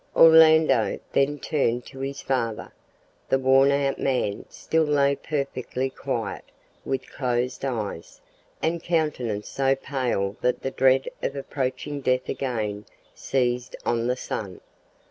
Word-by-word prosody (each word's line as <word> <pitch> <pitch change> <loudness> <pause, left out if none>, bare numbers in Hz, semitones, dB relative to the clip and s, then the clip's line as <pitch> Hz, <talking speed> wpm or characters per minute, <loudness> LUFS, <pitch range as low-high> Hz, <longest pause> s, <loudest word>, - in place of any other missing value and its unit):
Orlando 160 -6 +6
then 140 +2 +2
turned 125 -4 -1
to 135 - -11
his 135 +1 -4
father. 115 -5 -2 0.6
The 135 - +4
worn 135 +1 +5
out 140 -1 +1
man 125 -7 -1
still 160 - 0
lay 140 -2 +2
perfectly 135 -3 -3
quiet, - - -4 0.4
with 135 -1 -3
closed 125 -1 -2
eyes, 110 -10 -4 0.4
and 165 +1 0
countenance 150 -12 -1
so 135 0 +1
pale 125 -8 -2
that 125 0 0
the 135 - -2
dread 135 0 +3
of 135 - -2
approaching 140 +1 -3
death 130 -1 0
again 110 -6 -3 0.3
seized 125 -2 -1
on 120 0 0
the 125 +1 0
son. 100 -6 -5
135 Hz, 125 wpm, -25 LUFS, 120-140 Hz, 0.6 s, Orlando